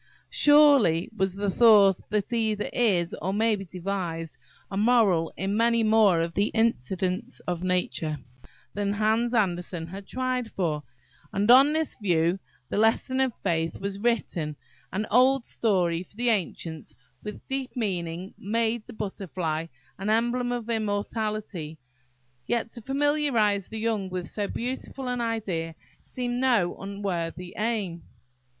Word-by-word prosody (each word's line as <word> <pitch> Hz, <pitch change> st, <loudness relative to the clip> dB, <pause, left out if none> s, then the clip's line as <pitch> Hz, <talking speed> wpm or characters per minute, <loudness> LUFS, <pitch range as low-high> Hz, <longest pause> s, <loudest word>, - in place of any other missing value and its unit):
Surely, 285 Hz, -, +5 dB
was 190 Hz, -2 st, 0 dB
the 200 Hz, 0 st, -1 dB
thought, 205 Hz, -4 st, +6 dB
there 210 Hz, 0 st, +1 dB
either 220 Hz, -3 st, 0 dB
is, 185 Hz, -8 st, +2 dB
or 185 Hz, +4 st, -1 dB
may 220 Hz, +2 st, +2 dB
be 195 Hz, -, -6 dB
devised, 175 Hz, -3 st, -4 dB, 0.4 s
a -, -, -4 dB
moral 205 Hz, -6 st, +3 dB
in 195 Hz, +2 st, -1 dB
many 230 Hz, +1 st, +3 dB
more 215 Hz, -6 st, +4 dB
of 165 Hz, 0 st, -2 dB
the 200 Hz, +4 st, +2 dB
incidents 195 Hz, -, 0 dB
of 175 Hz, -1 st, -3 dB
nature 180 Hz, -4 st, -1 dB, 0.6 s
than 200 Hz, 0 st, -1 dB
Hans 220 Hz, +3 st, +1 dB
Andersen 175 Hz, -5 st, 0 dB
has 195 Hz, +2 st, -8 dB
tried 255 Hz, -1 st, -2 dB
for; 160 Hz, -5 st, -1 dB, 0.5 s
and 205 Hz, +2 st, +3 dB
on 270 Hz, +4 st, +8 dB
this 315 Hz, 0 st, -1 dB
view 175 Hz, -1 st, +2 dB, 0.3 s
the -, -, -1 dB
"Lesson 225 Hz, +4 st, +2 dB
of 265 Hz, -1 st, +2 dB
Faith" 165 Hz, -1 st, -1 dB
was 195 Hz, 0 st, -4 dB
written–an 185 Hz, -, -3 dB
old 255 Hz, +2 st, +4 dB
story; 180 Hz, -6 st, +1 dB
for 185 Hz, -, -14 dB
the 240 Hz, +2 st, +1 dB
ancients, 165 Hz, -6 st, -2 dB, 0.3 s
with 210 Hz, -, -8 dB
deep 270 Hz, -1 st, -3 dB
meaning, 185 Hz, -5 st, -3 dB
made 225 Hz, +2 st, -1 dB
the -, -, -9 dB
butterfly 180 Hz, -6 st, -3 dB, 0.3 s
an 195 Hz, +2 st, -2 dB
emblem 240 Hz, +2 st, +1 dB
of 240 Hz, -2 st, -3 dB
immortality–yet, 180 Hz, -, -4 dB
to 235 Hz, -, -10 dB
familiarise 270 Hz, -7 st, +1 dB
the 220 Hz, -, -7 dB
young 215 Hz, -3 st, -1 dB
with 180 Hz, -1 st, -4 dB
so 205 Hz, -2 st, -3 dB
beautiful 255 Hz, +3 st, -4 dB
an 250 Hz, -1 st, -1 dB
idea 190 Hz, -8 st, -2 dB, 0.3 s
seemed 245 Hz, -1 st, -3 dB
no 235 Hz, -9 st, +2 dB
unworthy 180 Hz, -3 st, -4 dB
aim. 210 Hz, -6 st, -2 dB
205 Hz, 135 wpm, -26 LUFS, 175-230 Hz, 0.6 s, on